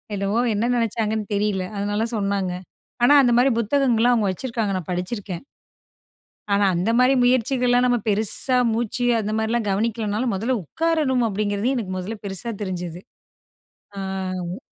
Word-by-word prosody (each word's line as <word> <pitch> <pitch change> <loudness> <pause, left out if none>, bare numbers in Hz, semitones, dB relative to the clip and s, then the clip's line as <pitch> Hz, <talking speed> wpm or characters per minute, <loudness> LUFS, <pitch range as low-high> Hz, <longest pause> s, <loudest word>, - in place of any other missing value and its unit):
என்னவோ, 200 +3 0 0.2
என்ன 230 +4 0
நெனச்சாங்கன்னு 220 -2 -1
தெரியல. 200 -2 0
அதனால 205 +3 -1
சொன்னாங்க. 200 -3 -1 0.5
ஆனா, 285 - +6
அந்த 240 -1 +3
மாரி 265 +1 +4
புத்தகங்கள்லாம், 245 0 +2
அவங்க 210 -4 +1
வச்சுருக்காங்க. 225 -2 -2
நான் 175 - -10
படிச்சிருக்கேன். 180 +2 -4 1.1
ஆனா 200 0 +3
அந்த 180 +6 0
மாரி 255 +2 +5
முயற்சிகள்லாம், 250 0 +2
நம்ம 245 - +3
பெருசா 220 +5 +1 0.2
மூச்சு 240 +2 -1 0.2
அந்த 210 +1 -3
மாரிலாம் 220 0 -1
கவனிக்கலனாலும், 220 +2 -1
"முதல்ல 235 +5 0
உட்காரணும்" 300 - 0
அப்படீங்கிறது, 205 +5 -1
எனக்கு 200 -7 -3
முதல்ல 205 +5 -5
பெருசா 200 +4 -4
தெரிஞ்சது. 180 -2 -4 1.0
ஆ - - -4 0.5
வ் 185 - -5
220 Hz, 135 wpm, -22 LUFS, 200-245 Hz, 1.1 s, ஆனா